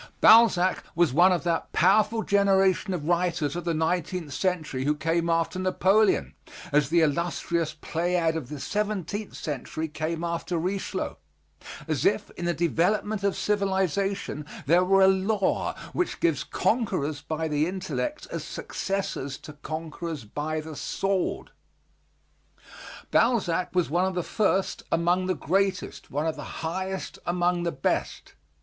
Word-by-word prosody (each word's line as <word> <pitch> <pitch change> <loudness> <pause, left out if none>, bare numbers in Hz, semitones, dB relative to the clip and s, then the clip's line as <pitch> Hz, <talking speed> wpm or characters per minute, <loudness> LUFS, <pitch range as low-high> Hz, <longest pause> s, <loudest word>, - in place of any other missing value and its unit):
Balzac 200 -5 +6
was 170 -6 +3
one 175 +5 +6
of 180 - +1
that 170 -2 -1
powerful 215 +5 +3
generation 195 -1 +3
of 165 -5 -3
writers 170 -4 +1
of 175 - -4
the 170 - +1
nineteenth 165 -1 -1
century 160 -7 -1
who 150 +2 +1
came 165 +3 0
after 165 +2 0
Napoleon, 185 - +2 0.4
as 145 -2 +3
the 170 +1 +4
illustrious 165 +1 0
Pleiad 170 0 0
of 145 -6 -4
the 150 -1 -6
seventeenth 205 +2 -3
century 155 +2 -4
came 160 +2 -3
after 170 +1 -2
Richelieu, 185 +4 -3 0.7
as - - -1
if - - +1
in 175 - -6
the 175 - +1
development 195 +6 +1
of 200 -1 +1
civilization 195 -5 0 0.2
there 170 +6 +4
were 195 +1 +4
a - - +7
law 190 +1 +1 0.2
which 360 - -1
gives 165 -5 +1
conquerors 180 - -1
by 160 +2 -3
the 150 +1 +1
intellect 190 +11 -3
as - - -4
successors 185 -8 -3
to 150 - -11
conquerors 155 -1 -6
by 155 +7 -3
the 155 0 -8
sword. 195 +6 -2 1.6
Balzac 190 -8 +2
was 180 -5 +1
one 175 +3 +2
of 190 -1 -2
the 180 - -1
first 195 -2 0
among 175 +2 +2
the 185 - +1
greatest, 195 +6 -1
one 145 +3 -2
of 160 - -1
the 160 - -7
highest 190 +3 -4
among 175 0 +1
the 170 0 -1
best. 135 -3 -2
175 Hz, 145 wpm, -26 LUFS, 160-190 Hz, 1.6 s, a